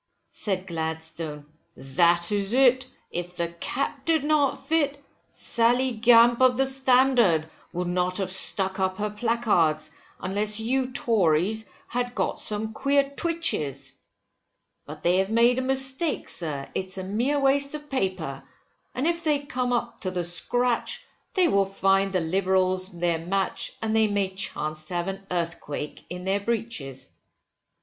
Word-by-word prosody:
Said 190 -3 -2
Gladstone, 160 -3 -5 0.3
that 170 +7 +2
is 205 +1 -1
it, 255 0 +4 0.2
if 175 +1 -5
the 170 -1 -2
cap 265 +11 -3
did 320 -2 +1
not 295 -2 +1
fit, 290 -3 +1 0.3
Sally 245 +3 +1
Gamp 235 +1 +5
of 255 -1 +5
the 270 - +3
Standard, 255 - +3 0.2
would 180 +1 -3
not 180 +1 0
have 190 -2 -2
stuck 190 0 +2
up 190 0 0
her 210 0 -2
placards, 205 -9 +1 0.3
unless 210 +3 -1
you 255 +3 0
Tories 215 -2 +1 0.2
had 245 0 -3
got - - -1
some 215 +1 +1
queer 275 +2 +1
twitches, 300 - 0 0.9
But - - -10
they 175 +1 +3
have 190 +1 +1
made 235 +3 +4
a - - 0
mistake, 265 +4 0
sir, 145 -5 -3
it's 190 0 -3
a 190 - -4
mere 240 +10 0
waste 280 +1 +2
of 295 0 -8
paper, 185 - -2 0.5
and 260 - -1
if 335 0 0
they 305 -2 +3
come 250 -4 -2
up 240 -1 -2
to 185 - -1
the 180 -1 -2
scratch, 240 +8 +1 0.3
they 370 -2 +4
will 200 -10 +3
find 195 0 +1
the 185 -2 0
Liberals 185 +2 +1
their 170 -3 -1
match, 190 +4 -2
and 220 0 0
they 220 -1 +4
may 200 -2 0
chance 155 -5 -2
to 175 - -5
have 175 +1 -1
an 195 0 -7
earthquake 165 -4 -4
in 180 +1 -6
their 195 +2 0
breeches. 205 - -4
200 Hz, 150 wpm, -25 LUFS, 175-250 Hz, 0.9 s, Gamp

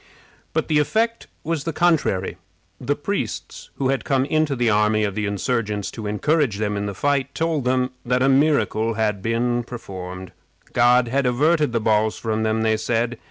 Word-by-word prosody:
But - - 0
the 150 -1 +3
effect 225 +10 0 0.2
was 160 -3 -2
the 165 - -2
contrary. 160 - +1 0.4
The 140 +3 -1
priests, 145 - -4
who 135 -1 -1
had 135 0 0
come 135 -1 +1
into 155 -1 +1
the 120 -1 0
army 105 +1 +2
of 100 -2 -1
the 105 +1 -2
insurgents 105 0 -2
to 110 -3 -6
encourage 130 +2 +1
them 105 -1 -1
in 100 0 -2
the 100 - -5
fight, 140 +2 0
told 160 -5 -1
them 130 0 +1
that 125 +1 +1
a - - +4
miracle 130 -6 +2
had 105 -3 0
been 120 +3 0
performed. 95 -6 -8 0.4
God 120 0 +4
had 135 +1 +1
averted 150 +4 +2
the 115 - 0
balls 110 0 +1
from 110 -1 -2
them, 110 0 0
they 110 0 +2
said. 120 +1 -1
120 Hz, 180 wpm, -22 LUFS, 110-140 Hz, 0.4 s, a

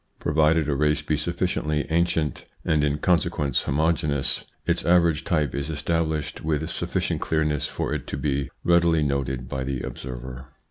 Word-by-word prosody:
Provided 80 0 +2
a 75 - +1
race 75 +1 +1
be 75 +1 0
sufficiently 75 -1 -1
ancient, 80 -2 +1 0.2
and 75 -2 +2
in 75 0 +1
con 90 +2 +3
sequence 75 -7 0
homogeneous, 75 -1 0 0.2
its - - +1
average 85 -2 +3
type 75 -7 0
is 70 +2 -3
established 80 0 -1
with 80 0 0
sufficient - - -1
clearness 75 -3 0
for - - -3
it - - -4
to - - -4
be 70 -3 -1
readily 85 -2 +4
noted 65 -3 -1
by 65 +1 -3
the 65 -1 -3
observer. 65 0 -7
75 Hz, 155 wpm, -25 LUFS, 70-80 Hz, 0.2 s, readily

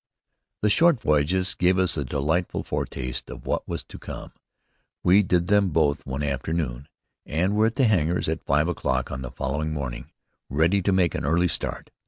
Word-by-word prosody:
The 105 - +4
short 165 +3 +4
voyages 85 +4 +2
gave 90 +1 +2
us 95 -1 +2
a 75 - -1
delightful 75 +6 -1
foretaste 65 0 -4
of - - -9
what - - -2
was - - -3
to - - -12
come. - - -8 0.7
We 95 +4 +6
did 90 -3 +1
them 100 0 +3
both 75 -4 +1
one 70 +2 -3
afternoon, 70 -1 -2 0.4
and 90 +6 0
were 110 +1 +4
at 115 - -3
the 135 - +3
hangars 90 -6 +1
at 80 +1 -2
five 75 +3 +2
o'clock 65 -6 -1
on 65 -1 -4
the 65 - -5
following 65 +4 -3
morning, 65 -5 -5 0.4
ready 80 +8 +2
to 100 - +1
make 95 -3 +2
an - - -3
early 85 +5 +2
start. - - -4
80 Hz, 185 wpm, -25 LUFS, 70-95 Hz, 0.7 s, We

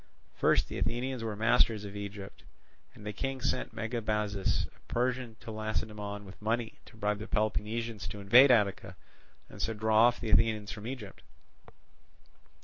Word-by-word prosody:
First - - +3
the - - -5
Athenians 120 +1 -1
were 110 -2 -3
masters 110 -1 +3
of 100 0 -8
Egypt, 100 -1 -7 0.5
and 105 - -12
the 105 - -3
King 135 +5 -3
sent 125 - -1
Megabazus 105 -4 -1
a - - -25
Persian 125 -1 -1
to 115 - -7
Lacedaemon 105 -1 -4
with 95 +1 -13
money 115 +1 -1
to 115 - -16
bribe 105 -1 0
the 110 - -6
Peloponnesians 110 +1 -1
to 105 - -7
invade 120 +8 +7
Attica 100 -5 +2 0.5
and - - -10
so 115 - -1
draw 110 +2 +5
off 120 - 0
the 110 - -3
Athenians 110 -2 +3
from 110 -1 -7
Egypt. 120 -7 -7
110 Hz, 155 wpm, -31 LUFS, 105-115 Hz, 0.5 s, invade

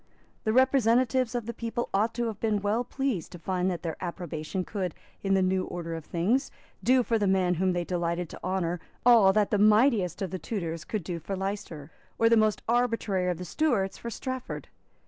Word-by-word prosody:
The 220 - +2
representatives 255 0 +3
of 240 -3 -2
the 235 - -4
people 235 +1 -3
ought 210 +4 +1
to 240 0 0
have 220 -3 -4
been 210 -3 0
well 215 +4 +1
pleased 250 - -2
to - - -7
find 180 +2 -1
that 175 -3 -4
their 165 -2 -3
approbation 175 0 -4
could, 185 -5 -3 0.3
in 195 -1 +2
the 190 - +3
new 185 0 +1
order 165 -1 -5
of 165 -2 -6
things, 205 +11 0 0.3
do 255 0 +4
for 225 -1 +1
the 205 - +1
man 190 -2 +3
whom 185 +2 +1
they 175 0 -1
delighted 175 0 -2
to - - -11
honour 180 -2 -1 0.3
all 230 -6 +7
that 210 -1 +2
the 210 - +2
mightiest 210 - +4
of 185 - -4
the 185 - -4
Tudors 170 -7 -4
could 215 -5 -3
do 170 0 -4
for 195 +5 -4
Leicester, 190 -6 -5 0.3
or 230 - +4
the 230 - +6
most 215 -1 +2
arbitrary 230 -6 +1
of 175 - -1
the 180 - -6
Stuarts 205 - 0
for 235 - -5
Strafford. 260 +2 -5
195 Hz, 205 wpm, -28 LUFS, 180-230 Hz, 0.3 s, all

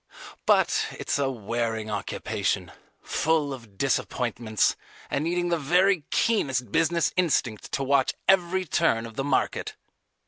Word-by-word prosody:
But - - +3
it's - - -1
a 140 -1 +1
wearing 115 -2 -3
occupation, 100 -1 -2 0.3
full 155 -3 +1
of 115 -6 -12
disappointments, 120 -4 0 0.4
and 145 - 0
needing 175 +1 0
the 170 -1 +1
very 180 +2 +3
keenest 130 - +1
business 165 +2 +2
instinct 140 - 0
to 140 - 0
watch 135 -1 +2
every 185 0 +3
turn 115 -7 +1
of 115 -1 -10
the 135 - -2
market. 140 -1 -1
135 Hz, 130 wpm, -26 LUFS, 115-170 Hz, 0.4 s, But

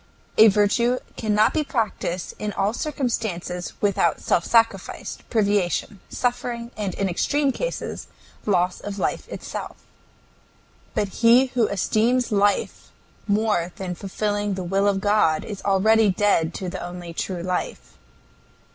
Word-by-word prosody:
A 220 - +10
virtue 215 +4 +3 0.2
cannot 215 -1 +2
be 310 - +1
practiced 215 -9 -2
in 210 -1 -3
all 195 +2 0
circumstances 220 - -3
without 195 -5 +2
self 170 - +1
sacrifice, 230 -1 +1
privation, 205 -2 0
suffering, 245 -1 -2
and 205 -4 -3
in 195 - 0
extreme 280 +10 +1
cases - - -4 0.4
loss 180 -2 +1
of 205 -1 -6
life - - -2
itself. - - -6 1.2
But 205 - 0
he 245 +3 +5
who 235 -4 +3
esteems 225 +5 +1
life 205 0 +1 0.4
more 205 -5 +1
than 185 -2 -4
fulfilling 205 +2 -2
the 185 - -4
will 195 +3 +1
of 195 -1 +1
God 205 -7 +2
is 205 -2 -6
already 210 +2 +4
dead 180 -4 +2
to 185 - -4
the 175 - -5
only 175 -1 -7
true 175 0 -3
life. 180 0 -4
205 Hz, 130 wpm, -23 LUFS, 185-225 Hz, 1.2 s, A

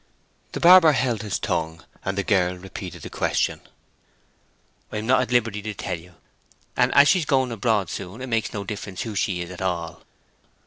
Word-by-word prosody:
The - - -3
barber 175 -3 +8
held 125 -5 0
his 105 -2 -2
tongue, 80 -4 -3 0.2
and 95 0 -3
the 100 - 0
girl 90 -2 +1
repeated 95 -1 -8
the - - -8
question. - - 0 1.3
"I - - -4
am 105 - -4
not 130 +2 +4
at 125 - -3
liberty 115 -4 +1
to 105 0 -5
tell 90 - -4
you. 90 +1 -17 0.6
And 125 0 +3
as 140 0 +8
she 185 - +5
is 160 - -2
going 130 -3 +1
abroad 110 -3 0
soon 95 +3 -6
it 130 - -6
makes 115 -3 -1
no 100 - -4
difference 100 -2 -5
who 110 - -5
she 95 -3 -1
is 85 - -10
at 90 - -9
all." 85 -3 -3
105 Hz, 195 wpm, -24 LUFS, 90-120 Hz, 1.3 s, barber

